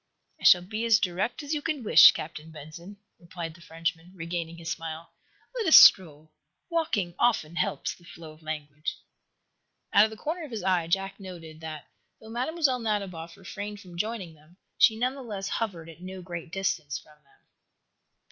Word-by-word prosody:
"I - - -8
shall 180 -1 +8
be 215 +5 -4
as 225 -1 +5
direct 185 +9 -2
as 290 +2 -3
you 300 - -1
can 295 -4 -3
wish, 210 - +9
Captain 155 0 -7
Benson," 160 +6 -11 0.2
replied 170 -1 -7
the 170 - -18
Frenchman, 165 +1 -4
regaining 170 -1 -5
his 165 0 -5
smile. 165 0 -6 0.4
"Let 465 -5 -2
us 320 - +8
stroll. 155 -4 +7 0.4
Walking 310 - 0
often 170 -9 +1
helps 145 -2 -1
the 175 - -20
flow 160 -1 -11
of 155 +1 -18
language." 150 -1 -5 1.0
Out 205 - +7
of - - -3
the 220 - -10
corner 325 +8 -4
of 305 - -8
his 220 -6 -5
eye 180 -3 +1
Jack 195 +3 -1
noted 165 -5 -10
that, 155 -2 -7 0.3
though 220 - -12
Mlle. 260 +2 0
Nadiboff 195 -7 -3
refrained 205 +2 -7
from 180 -3 -13
joining 200 -2 -3
them, 155 +3 -22 0.2
she 220 - +5
none 250 +3 0
the 275 - -9
less 205 -5 -5
hovered 185 -9 -3
at 165 +1 -13
no 185 0 -8
great 170 -2 -7
distance 190 -7 -2
from 150 -1 -17
them. 140 - -29
180 Hz, 180 wpm, -27 LUFS, 165-220 Hz, 1.0 s, wish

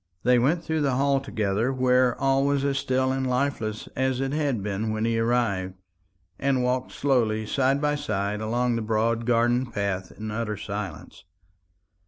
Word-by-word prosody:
They 125 0 +4
went 160 +8 +1
through 160 -1 -1
the 135 -3 +1
hall 140 +1 +2
together, 110 -2 -1
where 125 -1 +2
all 135 0 +2
was 140 0 +1
as 140 -1 +1
still 130 0 +1
and 130 -1 -1
lifeless 125 -5 -1
as 130 -1 0
it 135 0 -1
had 140 -9 0
been 105 +2 -2
when 110 +1 -1
he 115 0 +1
arrived, 115 -6 0 0.6
and 135 -2 +1
walked 125 +1 -1
slowly 115 -6 +1
side 135 +4 +1
by 150 0 +1
side 105 -8 -2
along 120 +2 0
the - - -2
broad 115 +1 0
garden 120 +1 +2
path 100 -5 -3
in 110 0 -6
utter 110 -1 -3
silence. 100 -1 -6
125 Hz, 170 wpm, -25 LUFS, 110-135 Hz, 0.6 s, They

